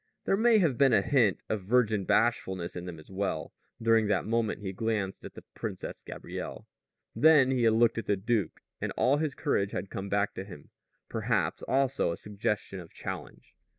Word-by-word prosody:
There -, -, +3 dB
may 225 Hz, +2 st, +5 dB
have 160 Hz, -, +2 dB
been 135 Hz, -3 st, +5 dB
even 100 Hz, -3 st, +4 dB
a -, -, -8 dB
hint 120 Hz, -9 st, +3 dB
of 110 Hz, -, -2 dB
virgin 110 Hz, -1 st, +2 dB
bashfulness 95 Hz, -7 st, +1 dB
in 90 Hz, 0 st, -5 dB
them 90 Hz, -2 st, -7 dB
as 80 Hz, +4 st, -14 dB
well, 95 Hz, +1 st, -3 dB, 0.3 s
during 115 Hz, -2 st, +3 dB
that 100 Hz, -3 st, +1 dB
moment 115 Hz, -1 st, 0 dB
he 95 Hz, -2 st, -4 dB
glanced 105 Hz, -2 st, -2 dB
at -, -, -10 dB
the -, -, -10 dB
Princess -, -, -6 dB
Gabrielle. -, -, -7 dB, 0.5 s
Then 150 Hz, -4 st, +6 dB
he 125 Hz, -3 st, +2 dB
had 110 Hz, -, +5 dB
looked 115 Hz, 0 st, +3 dB
at -, -, -7 dB
the 100 Hz, -, +2 dB
duke, 105 Hz, -3 st, -1 dB, 0.2 s
and -, -, -2 dB
all 135 Hz, +3 st, +3 dB
his 150 Hz, -3 st, -1 dB
courage 100 Hz, 0 st, 0 dB
had 95 Hz, +2 st, -4 dB
come 100 Hz, -2 st, -5 dB
back 100 Hz, +1 st, +1 dB
to -, -, -5 dB
him, 90 Hz, -7 st, -12 dB, 0.4 s
perhaps -, -, -1 dB
also 135 Hz, -7 st, +1 dB
a 85 Hz, -, -4 dB
suggestion 105 Hz, -1 st, -3 dB
of 85 Hz, -2 st, -11 dB
challenge. -, -, -8 dB
110 Hz, 195 wpm, -29 LUFS, 95-125 Hz, 0.5 s, Then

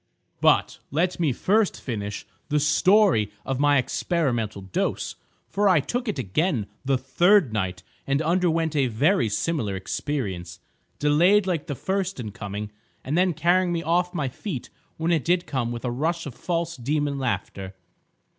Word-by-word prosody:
"But, -, -, +3 dB
let 175 Hz, +6 st, 0 dB
me 160 Hz, -5 st, +2 dB
first 205 Hz, -, +1 dB
finish 105 Hz, -5 st, -5 dB, 0.2 s
the 150 Hz, 0 st, +2 dB
story 155 Hz, -, +4 dB
of 135 Hz, -1 st, -2 dB
my 145 Hz, 0 st, +4 dB
experimental 120 Hz, -, -1 dB
dose, 95 Hz, -, -2 dB, 0.3 s
for 205 Hz, 0 st, +2 dB
I 180 Hz, -4 st, +5 dB
took 245 Hz, -, -3 dB
it 210 Hz, -, -2 dB
again 130 Hz, -, 0 dB, 0.2 s
the 135 Hz, -1 st, +2 dB
third 135 Hz, -, +3 dB
night, 95 Hz, -3 st, -2 dB, 0.2 s
and 140 Hz, +1 st, +2 dB
underwent 165 Hz, -1 st, +1 dB
a 140 Hz, -3 st, +3 dB
very 125 Hz, -, +2 dB
similar 105 Hz, -2 st, -1 dB
experience, 95 Hz, -, -4 dB, 0.4 s
delayed 175 Hz, +8 st, +4 dB
like 170 Hz, -5 st, -2 dB
the 145 Hz, -, -3 dB
first 190 Hz, +3 st, -2 dB
in 110 Hz, -4 st, -5 dB
coming, 105 Hz, 0 st, -6 dB, 0.3 s
and 140 Hz, -, -2 dB
then 180 Hz, -1 st, +2 dB
carrying 175 Hz, +3 st, +2 dB
me 170 Hz, -1 st, -1 dB
off 175 Hz, +2 st, +1 dB
my 155 Hz, -7 st, -2 dB
feet 130 Hz, -, -6 dB, 0.3 s
when 165 Hz, +2 st, 0 dB
it 165 Hz, -4 st, +2 dB
did 175 Hz, +1 st, +1 dB
come 120 Hz, -4 st, -2 dB
with 120 Hz, +1 st, -5 dB
a 125 Hz, -, 0 dB
rush 165 Hz, +7 st, -1 dB
of 140 Hz, -, -6 dB
this -, -, -23 dB
false 170 Hz, -2 st, -1 dB
demon 145 Hz, +2 st, -1 dB
laughter. 100 Hz, -5 st, -3 dB
145 Hz, 165 wpm, -25 LUFS, 120-175 Hz, 0.4 s, I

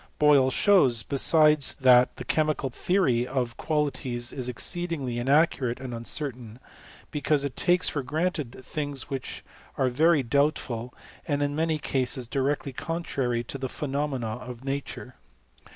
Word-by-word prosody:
• -, -, -24 dB
Boyle 145 Hz, -3 st, +5 dB
shows, 130 Hz, -, +4 dB
besides, 150 Hz, +2 st, +4 dB
that 125 Hz, -2 st, +5 dB
the 125 Hz, -, -8 dB
chemical 155 Hz, -2 st, 0 dB
theory 125 Hz, -7 st, +1 dB
of 125 Hz, -3 st, -2 dB
qualities 135 Hz, -6 st, -2 dB
is 125 Hz, -2 st, -3 dB
exceedingly 140 Hz, -2 st, -2 dB
inaccurate 135 Hz, -2 st, +2 dB
and 130 Hz, -2 st, -6 dB
uncertain; 120 Hz, -1 st, -4 dB, 0.5 s
be 150 Hz, -, -4 dB
cause 145 Hz, -2 st, +2 dB
it 140 Hz, -, -5 dB
takes 180 Hz, +1 st, +3 dB
for 145 Hz, -, 0 dB
granted 150 Hz, -2 st, -3 dB
things 145 Hz, -2 st, -4 dB
which 135 Hz, -2 st, -5 dB, 0.3 s
are 130 Hz, -1 st, +2 dB
very 150 Hz, +3 st, +3 dB
doubt 140 Hz, +5 st, +2 dB
ful, 120 Hz, 0 st, -6 dB, 0.4 s
and 145 Hz, -1 st, 0 dB
in 145 Hz, 0 st, -1 dB
many 160 Hz, 0 st, 0 dB
cases 130 Hz, -3 st, -1 dB
directly 140 Hz, +2 st, -2 dB
contrary 130 Hz, -6 st, -2 dB
to 135 Hz, +3 st, -6 dB
the 130 Hz, -, -3 dB
pheno 145 Hz, +2 st, -3 dB
mena 120 Hz, -5 st, -4 dB
of 125 Hz, 0 st, -10 dB
nature. 135 Hz, -2 st, -5 dB
135 Hz, 150 wpm, -26 LUFS, 125-150 Hz, 0.5 s, Boyle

